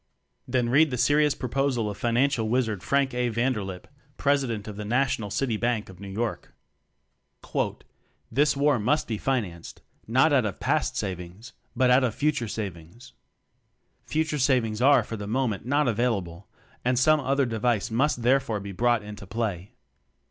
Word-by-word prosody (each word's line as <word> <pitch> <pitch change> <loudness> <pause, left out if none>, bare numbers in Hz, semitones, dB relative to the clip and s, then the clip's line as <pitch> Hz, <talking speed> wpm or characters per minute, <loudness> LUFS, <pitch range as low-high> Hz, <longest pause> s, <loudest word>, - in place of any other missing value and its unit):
Then 125 -1 0
read 150 +5 +5
the 125 - -3
serious 145 +3 +3
proposal 130 -2 -1
of 105 - -4
Financial 120 0 +1
Wizard 115 -5 0
Frank 140 +3 +1
A. 125 0 0
Vander 115 -1 0
lip, 95 -2 -8 0.3
President 130 -7 0
of 105 - -6
the 105 - -5
National 120 -1 0
City 110 +2 -1
Bank 115 -2 -1
of 95 -2 -13
New 100 - -8
York. 110 +4 -4 1.8
'This 140 +4 +2
war 140 -2 +3
must 125 +9 +1
be 110 -3 -3
financed, 105 -11 -3 0.2
not 130 +7 +3
out 130 -3 +4
of 100 - -4
past - - 0
savings, 95 +3 -6 0.2
but 125 +1 +3
out 130 +1 +5
of 120 -4 0
future 145 -5 0
sav 105 -4 -4
ings. 85 +11 -16 0.9
Future 155 -1 -1
savings 120 -5 +1
are 135 -2 +5
for 115 +1 -6
the 100 0 -6
mo 130 +4 0
ment 105 +1 -4
not 145 +1 +2
available 100 -6 -1 0.4
and 125 0 +1
some 155 +5 +4
other 135 0 +1
device 115 -2 0
must 125 +1 +1
therefore 125 -3 +2
be 100 0 -7
brought 120 +2 +1
into 105 -1 -9
play. 100 -3 -3
120 Hz, 165 wpm, -26 LUFS, 105-135 Hz, 1.8 s, read